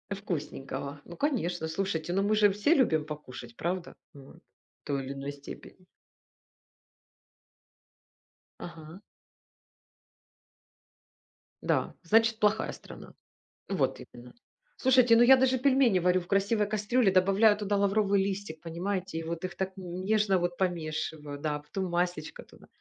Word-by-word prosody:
Вкусненького. 145 -6 -5
Ну 175 - -11
конечно, 180 - -1
слушайте, 165 -1 -2
ну 195 +1 +1
мы 215 +1 +2
же 210 -1 +5
все 210 +11 +2
любим 160 - +2
покушать, 125 -6 -9
правда? 180 +1 -3 0.2
Вот. 140 -1 -14
В - - -32
той 140 -2 -2
или 135 - -5
иной 140 +1 -6
степени. 145 +5 -12 2.7
Ага. 165 +1 -10 2.6
Да, - - 0
значит, 225 +4 +3
плохая 210 0 +1
страна. - - -12 0.6
Вот - - -1
именно. 120 +1 -13 0.4
Слушайте, 255 -3 +5
ну 235 - +6
я 265 +2 +8
даже 260 0 +2
пельмени 260 -6 +3
варю 180 +1 +2
в 175 - -11
красивой 200 +2 +1
кастрюле, 215 0 +1
добавляю 195 +3 +4
туда 205 -1 -1
лавровый 200 0 +2
листик, 195 -5 -4
понимаете, 180 +1 -3
и - - -4
вот 165 +2 -5
их 180 - -4
так 190 0 -2
н 180 0 -6
нежно 210 -2 +2
вот 175 0 -2
помешиваю, 155 -4 -3
да, 150 0 -2
потом 180 +5 -5
масличко 175 -3 -2
туда. - - -19
185 Hz, 130 wpm, -29 LUFS, 160-210 Hz, 2.7 s, я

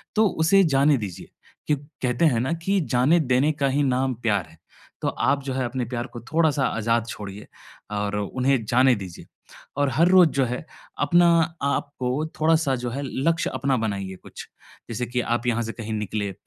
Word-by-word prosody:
तो 220 0 +4 0.2
उसे 195 +3 +5
जाने 140 +1 +4
दीजिए। 100 -6 -7 0.4
क्यु 150 - +2 0.3
कहते 125 +5 +2
हैं 125 -8 +3
ना 135 +6 -1
कि 195 0 +2 0.2
जाने 145 +8 +4
देने 135 +5 +3
का - - +4
ही 145 +2 +1
नाम 130 0 +1
प्यार 100 -7 +1
है। 80 0 -20 0.4
तो - - -1
आप 140 -1 0
जो 135 -1 -3
है, 130 -1 -1
अपने 125 0 -3
प्यार 120 +1 -4
को 120 - -6
थोड़ा-सा 155 -4 +2
आज़ाद 115 +1 0
छोड़िए 100 -2 -8 0.4
और 105 0 -2
उन्हें 130 +4 0
जाने 125 +2 +4
दीजिए, 95 -4 -9 0.5
और 145 -1 +2
हर 170 +2 +4
रोज़ 185 -3 +7
जो 135 -3 +1
है, 125 +5 -4 0.3
अपना 170 +4 +4 0.4
आपको 140 0 -1
थोड़ा-सा 155 -3 +2
जो 125 -1 -4
है, 135 +4 -4
लक्ष्य 160 +5 0
अपना 130 +1 0
बनाइए 100 -3 -3
कुछ, - - -10 0.4
जैसे 120 +2 -3
कि 125 0 -1
आप 120 +1 -2
यहाँ 120 0 +1
से 115 - -4
कहीं 110 -1 -6
निकले, 105 -1 -3
130 Hz, 185 wpm, -24 LUFS, 115-145 Hz, 0.5 s, रोज़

